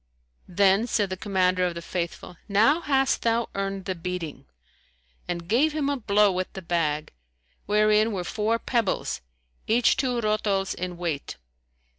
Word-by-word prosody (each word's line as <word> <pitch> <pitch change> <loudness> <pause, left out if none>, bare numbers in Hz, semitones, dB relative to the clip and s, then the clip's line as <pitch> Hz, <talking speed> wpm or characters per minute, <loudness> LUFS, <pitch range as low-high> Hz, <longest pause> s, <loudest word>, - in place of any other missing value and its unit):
Then 195 +4 +3
said 205 -4 0
the - - -1
Commander 185 -2 +1
of 175 -1 0
the 170 - -5
Faithful, 175 0 -4
"Now 225 +11 +4
hast 270 -3 +1
thou 230 0 +1
earned 195 -1 -3
the 190 - -1
beating," 175 -3 -5 0.8
and 170 -1 -4
gave 280 - +3
him 295 -2 0
a - - 0
blow 210 -3 +3
with 185 0 -3
the 190 - -7
bag, 155 -3 -1 0.5
wherein 215 +1 +3
were 190 -4 -3
four 220 +3 0
pebbles 230 - -1 0.5
each 230 +2 +3
two 255 -3 0
rotols 210 -3 0
in 180 -1 -5
weight. 165 -5 -4
195 Hz, 150 wpm, -26 LUFS, 180-225 Hz, 0.8 s, Now